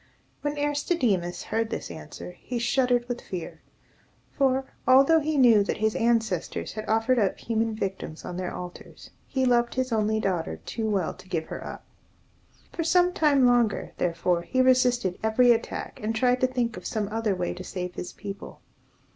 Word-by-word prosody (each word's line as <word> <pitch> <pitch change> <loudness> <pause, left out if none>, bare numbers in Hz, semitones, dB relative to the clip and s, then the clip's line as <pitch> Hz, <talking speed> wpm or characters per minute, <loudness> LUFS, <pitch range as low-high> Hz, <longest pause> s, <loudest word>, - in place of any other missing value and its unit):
When 295 0 -2
Aristodemus 265 - 0
heard 225 0 -1
this - - -5
answer, - - -9
he 240 +7 -6
shuddered 245 0 +1
with 245 -1 -4
fear; 180 -3 -7 0.7
for, 265 -1 +1 0.2
although 275 +5 +6
he 310 0 -1
knew 235 -6 +6
that - - -2
his 220 0 0
ancestors 225 -8 0
had 215 +1 -6
offered 225 +3 +2
up 200 -3 +1
human 225 -1 -1
victims 190 -6 -5
on 180 - -5
their 180 0 -3
altars, 180 0 -9 0.2
he 265 -1 0
loved 240 -1 +2
his 260 -1 -1
only 220 -1 +1
daughter 175 - -1
too 220 -1 -2
well 195 -5 0
to 190 - -16
give 165 -3 -1
her - - -6
up. - - -8 0.9
For 335 - -2
some 355 +2 +3
time 285 -6 +4
longer, 240 -3 +2
therefore, 170 0 +1
he 255 +9 -2
resisted 250 -7 +3
every 230 +3 +4
attack, 230 -1 -2
and 220 +1 -2
tried 250 +2 +2
to 255 - +4
think 245 -3 -2
of - - -6
some 215 -3 -2
other 220 -2 0
way 180 -1 -2
to 185 - -8
save 180 -1 -5
his 180 0 -6
people. 200 -1 -8
225 Hz, 175 wpm, -26 LUFS, 195-255 Hz, 0.9 s, although